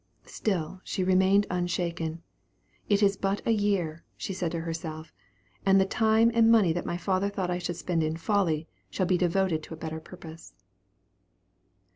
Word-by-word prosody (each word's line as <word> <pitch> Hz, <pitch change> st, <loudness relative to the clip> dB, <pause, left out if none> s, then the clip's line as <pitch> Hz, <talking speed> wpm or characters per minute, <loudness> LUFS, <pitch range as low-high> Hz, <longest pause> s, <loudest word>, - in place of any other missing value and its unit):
Still 185 Hz, -3 st, -3 dB
she 185 Hz, -, -2 dB
remained 190 Hz, +2 st, +4 dB
unshaken. 170 Hz, -2 st, -2 dB, 0.7 s
It 205 Hz, 0 st, +3 dB
is 200 Hz, 0 st, +4 dB
but 195 Hz, +1 st, -2 dB
a -, -, +2 dB
year, 195 Hz, -7 st, 0 dB
said 195 Hz, -, -4 dB
she 180 Hz, -3 st, -1 dB
to 165 Hz, 0 st, -3 dB
herself, 160 Hz, -1 st, -6 dB, 0.5 s
and 195 Hz, 0 st, +5 dB
the 190 Hz, -, +4 dB
time 220 Hz, +3 st, +3 dB
and 230 Hz, -1 st, +5 dB
money 205 Hz, -8 st, +5 dB
that 175 Hz, -, -4 dB
my 175 Hz, -, -2 dB
father 190 Hz, +2 st, 0 dB
thought 190 Hz, -3 st, -2 dB
I 180 Hz, -, -1 dB
should 175 Hz, -1 st, -3 dB
spend 175 Hz, -1 st, -1 dB
in 155 Hz, +1 st, -1 dB
folly, 165 Hz, -4 st, 0 dB, 0.2 s
shall 185 Hz, -, -1 dB
be 180 Hz, -1 st, +2 dB
devoted 180 Hz, -2 st, +1 dB
to 160 Hz, -, -9 dB
a -, -, -16 dB
better 160 Hz, 0 st, -5 dB
purpose. 165 Hz, -, -12 dB
180 Hz, 170 wpm, -28 LUFS, 165-195 Hz, 0.7 s, and